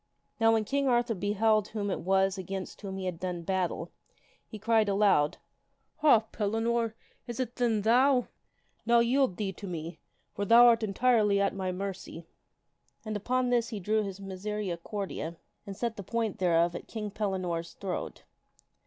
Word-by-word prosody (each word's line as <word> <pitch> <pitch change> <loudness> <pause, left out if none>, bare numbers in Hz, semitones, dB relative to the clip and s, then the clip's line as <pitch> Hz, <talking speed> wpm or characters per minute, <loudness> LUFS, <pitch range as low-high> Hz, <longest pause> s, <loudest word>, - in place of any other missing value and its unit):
Now 225 0 +5
when 220 -1 +1
King 280 +5 0
Arthur 240 -1 +2
beheld 210 +1 +1
whom 205 -2 -3
it - - -2
was 190 +1 +2
against 190 0 -6
whom 195 -2 -5
he 190 - -4
had 180 -3 -3
done 180 -2 -4
battle, 185 0 -2 0.6
he 215 - -8
cried 220 0 +2
out - - +1
aloud, 195 -8 +3 0.3
" - - -46
Ha! 285 -8 +6
Pellinore, 225 +1 0 0.3
is 240 0 -6
it 250 -2 -3
then 225 -4 +1
thou? 250 +3 +4 0.6
Now 235 +1 +4
yield 240 -3 +2
thee 200 -3 -2
to 200 +2 -9
me, 165 -1 -6 0.3
for 205 - -3
thou 230 +4 +7
art 235 -1 +5
entirely 215 -1 +2
at 200 0 +1
my 190 -2 -2
mercy." 185 -3 -6 0.8
And 215 0 -3
upon 250 +4 0
this 235 -2 +2
he 220 -3 -5
drew 215 +3 +1
his 195 -2 -5
misericordia 195 -3 -4 0.3
and 195 -1 -7
set 235 -2 -2
the 200 - -6
point 225 +1 -2
thereof 170 -1 +3
at - - -7
King 210 -2 -5
Pellinore's 185 -5 -3
throat. 190 -2 -5
205 Hz, 170 wpm, -29 LUFS, 190-230 Hz, 0.8 s, thou